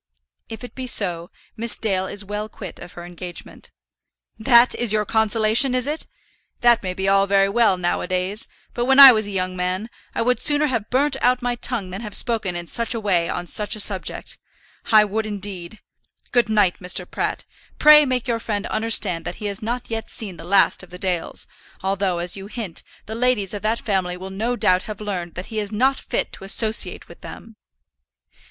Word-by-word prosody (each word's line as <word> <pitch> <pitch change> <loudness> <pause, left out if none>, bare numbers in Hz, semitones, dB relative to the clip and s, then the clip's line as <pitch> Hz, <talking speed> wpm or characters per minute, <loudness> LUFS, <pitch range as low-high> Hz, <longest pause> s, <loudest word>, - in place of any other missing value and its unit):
"If 225 +2 -8
it 245 - -9
be 260 -1 -6
so, 175 -7 0 0.3
Miss 230 0 -2
Dale 190 -4 -1
is 205 +1 -5
well 210 +2 -5
quit 195 -4 -10
of 175 - -11
her 175 - -9
engagement." 175 0 -9 0.7
"That 235 +2 +5
is 240 -3 -1
your 215 -1 +1
consolation, 220 +4 +3
is 250 -1 +1
it? 300 +2 -3 0.5
That 235 -1 +5
may 185 -1 -4
be 190 +1 -2
all 195 0 +3
very 195 0 +3
well 220 -3 +3
now 175 -1 -1
a - - -5
days; 185 +3 0 0.3
but 240 - -2
when 265 +2 +4
I 275 -1 +13
was 215 -3 0
a - - -6
young 185 -2 -2
man, 185 +5 -3 0.2
I - - 0
would 250 +1 +1
sooner 295 0 +3
have 230 -7 -2
burnt 270 +2 +1
out 250 0 +2
my 245 0 0
tongue 235 -5 -3
than 190 +4 -6
have 210 -3 -5
spoken 220 -7 -1
in 175 0 -4
such 235 +6 -2
a - - -2
way 180 -6 +1
on 175 - -3
such 210 +4 -1
a - - -7
subject. 200 -2 +1 0.5
I 215 -1 +7
would, 215 +2 -3
indeed. 200 -2 -6 0.5
Good 240 -2 +2
night, 205 -4 +2
Mr. 180 0 +1
Pratt. - - -3 0.3
Pray 300 0 +8
make 255 -3 -1
your 235 -1 0
friend 210 -2 -3
understand 215 -6 +2
that 175 - -5
he 210 - -8
has 200 -1 -3
not 235 +2 -4
yet 225 0 -4
seen 195 -6 -3
the - - -10
last 190 +3 +3
of 180 - -12
the 180 - -10
Dales; 180 -3 -2 0.4
although, 190 -2 0
as 175 0 -1
you 195 0 -8
hint, 210 -6 -5 0.2
the 220 - -7
ladies 230 -5 0
of 205 - -5
that 220 +2 0
family 185 -4 -2
will 190 +1 -8
no 225 +6 -2
doubt 185 -5 +2
have 210 - -6
learned 185 -5 -5
that 185 +5 -7
he 215 - -1
is 205 -1 -4
not 260 +6 +1
fit - - -2
to - - -9
associate 215 +3 +1
with - - -15
them." 225 -1 -11
210 Hz, 210 wpm, -21 LUFS, 185-235 Hz, 0.7 s, I